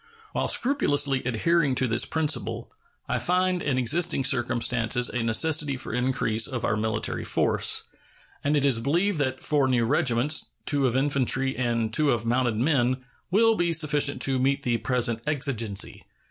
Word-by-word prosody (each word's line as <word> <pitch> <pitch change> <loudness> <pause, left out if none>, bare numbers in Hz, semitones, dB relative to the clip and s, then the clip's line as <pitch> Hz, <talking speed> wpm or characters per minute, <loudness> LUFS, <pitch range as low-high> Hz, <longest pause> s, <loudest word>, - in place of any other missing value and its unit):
While - - -1
scrupulously 145 - +1
adhering 140 +4 +1
to 130 - 0
this 115 0 +1
principle, 160 -2 -2 0.4
I - - -1
find 180 0 +1
in 140 -4 -1
existing 135 +3 0
circumstances 120 -2 0
a 125 - -2
necessity 145 +5 +1
for 125 - -3
increase 125 -3 0
of 125 -4 -4
our - - +1
military 110 0 -2
force, - - 0 0.6
and 145 +1 +1
it 140 - +1
is 130 -5 +2
believed 170 - 0
that 130 -2 -2
four 145 -3 +2
new 120 -3 +1
regiments, 135 +2 +1 0.2
two 140 -2 +2
of 125 +1 0
infantry 135 -1 +1
and 115 -3 -1
two 150 +2 +2
of 115 -3 0
mounted 120 -1 +1
men, 130 -1 +1 0.2
will 225 +5 +4
be 175 -5 0
sufficient 150 -3 +1
to 135 -2 +1
meet 140 +2 0
the 120 -1 0
present 120 -2 -1
exigency. 125 -9 -1
130 Hz, 160 wpm, -25 LUFS, 120-150 Hz, 0.6 s, will